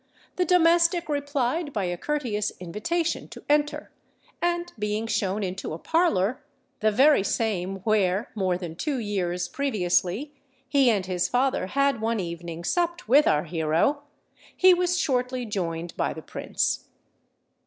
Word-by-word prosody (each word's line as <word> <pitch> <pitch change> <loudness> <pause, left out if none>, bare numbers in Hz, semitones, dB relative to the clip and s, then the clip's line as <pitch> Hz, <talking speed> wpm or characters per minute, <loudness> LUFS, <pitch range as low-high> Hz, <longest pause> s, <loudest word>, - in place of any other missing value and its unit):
the 365 - +1
domestic 340 0 +4
replied 285 +1 -1
by 210 -6 -2
a 175 -1 -1
courteous 225 -3 -2
invitation 325 - -2
to - - -12
enter; 295 0 +1 0.5
and 345 0 -1
being 210 +1 -1
shown 205 -2 -1
into 185 -2 -4
a - - -4
parlour—the 265 - 0
very 265 +2 +5
same 195 -3 -1
where 200 0 +1
more 185 -4 0
than 175 -3 -7
two 285 - -2
years 180 -6 -2
previously 215 0 0 0.3
he 275 -3 +4
and 200 -5 +1
his 180 -1 -1
father 255 -5 +1
had 275 0 +1
one 225 0 0
evening 170 -1 -5
supped 345 - -1
with 285 +4 +5
our 150 - +3
hero—he 285 - 0
was 355 0 +1
shortly 255 -5 0
joined 175 -5 -3
by - - -1
the 160 - -9
Prince. - - -2
230 Hz, 135 wpm, -26 LUFS, 185-295 Hz, 0.5 s, very